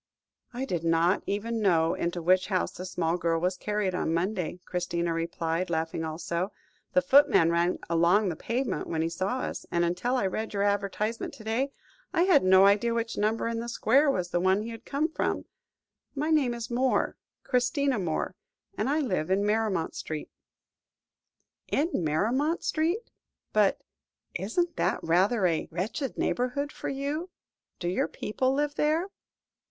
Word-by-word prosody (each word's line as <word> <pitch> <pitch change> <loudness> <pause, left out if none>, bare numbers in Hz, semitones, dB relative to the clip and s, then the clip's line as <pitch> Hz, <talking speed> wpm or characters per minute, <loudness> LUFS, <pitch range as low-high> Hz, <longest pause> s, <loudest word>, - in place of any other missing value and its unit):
"I 255 +2 -3
did 175 -10 -2
not 165 +3 +3
even 225 +3 -2
know 165 -4 +3
into 170 0 -2
which 185 +2 +3
house 185 -3 0
the 185 - -7
small 170 -1 0
girl 165 -1 +1
was 180 +2 0
carried 210 0 -1
on 180 - -1
Monday," 180 0 -2
Christina 175 -1 -1
replied, 165 +1 -2
laughing 160 0 -1
also; 170 +4 -3 0.4
"the 275 - +4
footman 270 - +5
ran 170 +1 +2
along 170 +5 +3
the 170 - -3
pavement 245 - -2
when 160 -1 -1
he 165 - 0
saw 190 +9 -2
us, - - -4
and 170 0 +1
until 180 +9 0
I 250 - +1
read 215 +3 -3
your 200 - +1
advertisement 205 +2 -1
to 220 - -12
day, 240 +6 -1 0.4
I 345 -1 +3
had 370 - +5
no 190 +1 +7
idea 210 +4 +3
which 230 0 -2
number 215 +2 0
in 230 0 -2
the 235 +1 -4
square 265 +5 +3
was 180 -9 0
the 175 - +1
one 190 +3 +2
he 230 - -6
had 230 +1 -10
come 290 +3 0
from. 320 - -2 0.7
My 300 +3 -1
name 270 -6 +3
is 235 0 -6
Moore 255 +2 +1 0.3
Christina 250 0 +1
Moore 175 +1 -2 0.4
and 215 +5 -1
I 300 +2 +2
live 185 - -1
in 195 +2 +2
Maremont 210 -5 0
Street." 155 -1 -5 1.4
"In 320 +5 0
Maremont 245 - +1
Street? 340 +9 -1 0.4
But 210 -2 +3 0.5
isn't 340 - -1
that - - +1
rather 190 +6 +3
a 165 -3 +1
wretched 215 - -3
neighbourhood 255 +4 -1
for - - -5
you? 285 +6 -3 0.5
Do 175 - -4
your 180 - +1
people 255 +5 -1
live 290 +2 0
there?" 310 +5 +1
205 Hz, 165 wpm, -28 LUFS, 175-255 Hz, 1.4 s, no